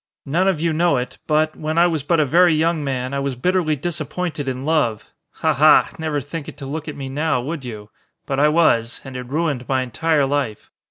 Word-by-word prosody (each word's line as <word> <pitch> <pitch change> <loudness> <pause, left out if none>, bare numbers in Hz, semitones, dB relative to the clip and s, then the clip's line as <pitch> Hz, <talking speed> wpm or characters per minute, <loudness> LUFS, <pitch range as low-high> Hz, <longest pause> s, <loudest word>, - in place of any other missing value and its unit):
None 170 +7 +1
of 190 -5 +1
you 165 0 0
know 170 -2 +2
it, 125 +1 -5
but, 155 0 +1
when 155 +1 -3
I 170 - +6
was 165 -4 0
but 165 +4 +1
a 155 - +4
very 170 +3 +4
young 160 0 +1
man 130 -1 -3
I 140 - -1
was 140 -1 -2
bitterly 175 +2 +1
disappointed 155 0 -4
in 130 +1 -3
love. 145 -9 0 0.2
Ha! - - 0
ha! - - +5
Never 155 -2 -1
think 145 +2 -6
it - - -12
to 140 - -7
look 155 +3 -5
at 150 - -5
me 135 -1 -5
now, 145 0 0
would 145 +3 -5
you? 105 -4 -8 0.3
But 135 -1 -2
I 150 - +5
was, 150 -8 +2
and 135 -1 -9
it 125 -1 -6
ruined 145 -3 -2
my 130 -1 +1
entire 145 +4 +1
life. 135 -6 -2
150 Hz, 225 wpm, -21 LUFS, 130-160 Hz, 0.3 s, I